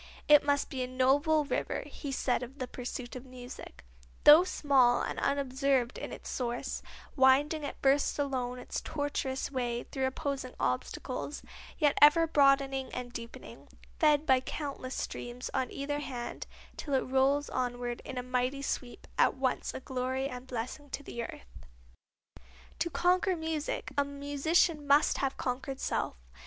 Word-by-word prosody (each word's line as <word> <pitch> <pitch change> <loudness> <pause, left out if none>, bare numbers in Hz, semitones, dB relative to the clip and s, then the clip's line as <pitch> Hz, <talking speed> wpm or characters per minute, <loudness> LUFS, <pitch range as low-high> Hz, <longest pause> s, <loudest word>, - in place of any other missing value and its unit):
"It 295 -1 +8
must 285 -1 +1
be 260 - -3
as 250 - -2
a - - -12
noble 285 +4 +3
river," - - -2
he 285 - -7
said 260 -2 0
of 255 +3 -8
the 255 - -4
pursuit 250 0 -6
of 255 - -7
music; 250 - -11 0.4
"though 305 +4 +10
small 270 -8 +3
and - - -3
unobserved 275 -2 +1
in - - -6
its - - -8
source, 245 +1 -3 0.3
winding 285 +3 +4
at 285 - -5
first 275 +1 +3
alone 255 -3 -1
its 250 - -5
tortuous 285 -3 -2
way 240 -2 -2
through 265 -1 -2
opposing 265 -1 -4
obstacles, 255 - -3 0.3
yet 295 -3 +2
ever 295 +3 +8
broadening 275 -3 +3
and 245 -1 -5
deepening, 230 0 -9 0.3
fed 300 -2 +4
by 260 -3 +5
countless 270 -1 -5
streams 240 +1 -5
on 255 -2 0
either 290 +1 -3
hand 250 -4 -5 0.3
till 285 -2 -2
it 265 - +3
rolls 270 +2 +2
onward 245 -1 -2
in 260 - -7
a 250 - -2
mighty 255 +2 -1
sweep, 250 -3 -4
at - - +4
once 260 -1 -1
a - - -6
glory 260 +1 -2
and 250 -1 -7
a - - -25
blessing 255 +4 -5
to 285 - -5
the 235 - -5
earth." - - -9 1.2
To 340 - 0
conquer 365 +2 +2
music 320 -2 -3
a 285 - +3
musician 285 +2 +1
must 285 +2 +4
have 270 -1 -1
conquered 265 +1 -3
self. - - -1
270 Hz, 160 wpm, -31 LUFS, 250-290 Hz, 1.2 s, though